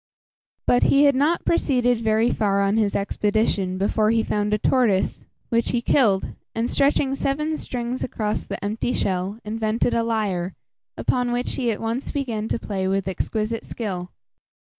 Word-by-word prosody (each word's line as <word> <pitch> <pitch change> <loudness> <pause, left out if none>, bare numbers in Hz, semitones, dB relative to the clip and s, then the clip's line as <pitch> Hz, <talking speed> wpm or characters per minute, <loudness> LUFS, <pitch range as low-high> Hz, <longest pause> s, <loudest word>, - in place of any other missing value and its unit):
But 245 - +4
he 280 +1 +5
had 285 -1 +6
not 295 +6 +1
proceeded 245 -7 +2
very 220 +1 +2
far 200 -2 +1
on 200 +2 +2
his 210 -3 +1
expedition 200 -2 0
before 215 +2 +1
he 225 0 +2
found 210 -1 -1
a 210 - +3
tortoise, 215 -4 +1 0.2
which 230 0 +1
he 245 - +1
killed, 210 -10 +2 0.2
and, 225 +1 0
stretching 275 -1 +2
seven 300 +3 -1
strings 245 -3 -4
across 215 -4 -2
the - - -5
empty 220 +4 -1
shell, 190 +2 -1
invented 220 +2 0
a 230 - +2
lyre, 205 -6 -1 0.4
upon 245 -1 0
which 245 +1 -1
he 245 -3 -1
at 215 - -1
once 230 +4 -2
began 230 -7 -2
to - - 0
play 195 -4 -3
with 195 0 0
exquisite 215 +4 -2
skill. 185 -6 -5
225 Hz, 160 wpm, -23 LUFS, 205-245 Hz, 0.4 s, had